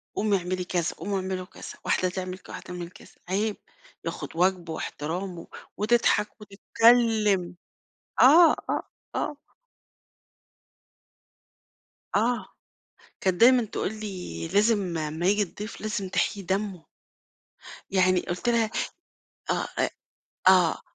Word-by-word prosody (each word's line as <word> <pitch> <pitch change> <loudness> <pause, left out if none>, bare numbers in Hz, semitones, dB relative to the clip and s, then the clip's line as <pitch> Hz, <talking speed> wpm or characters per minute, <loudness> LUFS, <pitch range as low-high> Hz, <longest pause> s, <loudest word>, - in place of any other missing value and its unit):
قومي 205 -1 +2
اعملي 180 0 -3
كذا، 175 -1 -1
قومي 200 0 -3
اعملوا 185 -1 -3
كذا، - - -10
واحدة 185 - +2
تعمَل 185 0 -5
ك - - -18
واحدة - - -7
تعمَل 180 -1 -7
كذا. - - -17
عيب، 205 +3 0 0.5
ياخُد - - -5
واجبه 175 -1 +1
واحترامه." 170 +4 -5 0.3
وتضحَك 215 -1 +2
وتتكلَّم. 210 -3 +3 0.7
آه، 320 +6 +8 0.2
آه، - - 0 0.3
آه. 295 - -2 2.8
آه، 235 +4 +1 0.8
كانت 185 -2 0
دايمًا 245 0 +7
تقول 210 -1 -3
لي: 190 -5 -5
"لازم 200 -2 +2
أما 155 +2 -2
ييجي 205 +2 +3
الضيف 205 +3 -6
لازم 210 -3 -3
تحييِ 200 +2 0
دمه." 190 -2 -2 1.1
يعني 185 -2 +3
قُلت 180 +8 -2
لها 230 -2 +2 0.8
آه - - 0
أ - - +2 0.6
آه 180 -3 +5
195 Hz, 110 wpm, -26 LUFS, 180-215 Hz, 2.8 s, آه